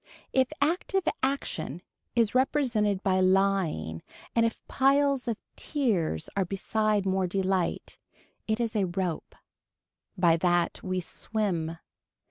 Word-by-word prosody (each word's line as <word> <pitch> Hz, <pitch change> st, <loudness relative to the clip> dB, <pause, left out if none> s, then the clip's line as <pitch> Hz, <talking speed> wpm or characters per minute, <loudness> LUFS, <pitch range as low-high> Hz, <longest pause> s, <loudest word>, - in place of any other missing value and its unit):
If 260 Hz, 0 st, +3 dB
active 355 Hz, +5 st, +1 dB, 0.2 s
action 185 Hz, -, -2 dB, 0.3 s
is 230 Hz, -3 st, +3 dB
represented 240 Hz, -7 st, +1 dB
by 190 Hz, -2 st, +2 dB
lying 185 Hz, -, +1 dB, 0.3 s
and 230 Hz, -1 st, +4 dB
if 225 Hz, -, -5 dB
piles 275 Hz, -1 st, +2 dB
of 230 Hz, -3 st, -1 dB, 0.2 s
tears 205 Hz, -, -1 dB
are 195 Hz, -, +2 dB
beside 210 Hz, +2 st, 0 dB
more 190 Hz, -1 st, +1 dB
delight, 190 Hz, -1 st, -1 dB, 0.5 s
it 220 Hz, +1 st, 0 dB
is 230 Hz, -1 st, -1 dB
a 200 Hz, -3 st, +2 dB
rope. 175 Hz, -2 st, -3 dB, 0.8 s
By 170 Hz, -2 st, +4 dB
that 175 Hz, 0 st, +1 dB
we 185 Hz, -1 st, -2 dB
swim. 170 Hz, -4 st, -2 dB
195 Hz, 115 wpm, -28 LUFS, 180-235 Hz, 0.8 s, and